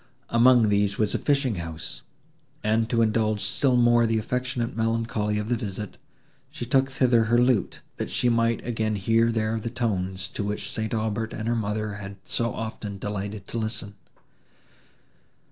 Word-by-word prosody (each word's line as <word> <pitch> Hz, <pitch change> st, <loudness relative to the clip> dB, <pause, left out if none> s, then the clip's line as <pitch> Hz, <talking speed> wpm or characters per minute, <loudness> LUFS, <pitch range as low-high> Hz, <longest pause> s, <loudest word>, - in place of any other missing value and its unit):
Among 120 Hz, -1 st, +5 dB
these 100 Hz, -1 st, +2 dB
was 110 Hz, -2 st, +1 dB
the -, -, 0 dB
fishing 140 Hz, -7 st, +1 dB
house; 80 Hz, -7 st, -6 dB, 0.6 s
and, 110 Hz, +1 st, +1 dB
to 115 Hz, -1 st, +3 dB
indulge 110 Hz, -1 st, +1 dB
still 130 Hz, -3 st, +2 dB
more 120 Hz, -1 st, +5 dB
the 115 Hz, 0 st, +1 dB
affectionate 125 Hz, +1 st, -2 dB
melancholy 115 Hz, -2 st, 0 dB
of 105 Hz, 0 st, -2 dB
the 120 Hz, -, +1 dB
visit, 105 Hz, -2 st, -5 dB, 0.5 s
she 120 Hz, -, -6 dB
took 135 Hz, +2 st, +2 dB
thither 125 Hz, -4 st, +3 dB
her 115 Hz, +2 st, +3 dB
lute, 125 Hz, -4 st, +2 dB, 0.2 s
that -, -, -3 dB
she 125 Hz, -, +1 dB
might 115 Hz, -1 st, +2 dB
again 110 Hz, -2 st, -1 dB
hear 115 Hz, +4 st, +2 dB
there 110 Hz, 0 st, 0 dB
the 115 Hz, -, -4 dB
tones, 95 Hz, -6 st, -2 dB
to 105 Hz, -, -4 dB
which 105 Hz, +1 st, -3 dB
St. 110 Hz, +1 st, -2 dB
Aubert 110 Hz, 0 st, -2 dB
and 110 Hz, -, -4 dB
her 120 Hz, -, +1 dB
mother 105 Hz, -1 st, -2 dB
had 100 Hz, -1 st, -7 dB
so 115 Hz, -1 st, 0 dB
often 110 Hz, -2 st, -5 dB
delighted 100 Hz, 0 st, -5 dB
to 115 Hz, -, -2 dB
listen. 110 Hz, -2 st, -3 dB
110 Hz, 165 wpm, -26 LUFS, 105-120 Hz, 0.6 s, Among